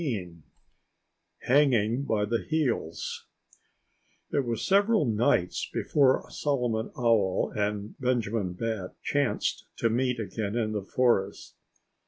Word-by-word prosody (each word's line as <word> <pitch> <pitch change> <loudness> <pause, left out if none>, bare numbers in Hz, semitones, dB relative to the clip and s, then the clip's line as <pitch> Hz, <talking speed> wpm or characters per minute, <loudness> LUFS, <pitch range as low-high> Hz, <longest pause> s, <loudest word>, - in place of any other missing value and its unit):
XIV 90 - -4 1.0
Hanging 130 -2 +3
By 105 -4 +1
The 115 +2 -1
Heels 125 - -2 1.0
It 140 - +1
was 115 -2 -2
several 200 -1 +3
nights 105 -6 +1
before 135 -3 +2
Solomon 125 -6 -1
Owl 115 -6 +2
and 105 0 -2
Benjamin 115 -7 0
Bat 105 -1 -4
chanced 145 -3 -1
to 115 - +1
meet 125 +1 0
again 110 -1 -3
in 110 -2 0
the 105 -1 -2
forest. 100 -2 0
115 Hz, 110 wpm, -28 LUFS, 105-130 Hz, 1.0 s, Hanging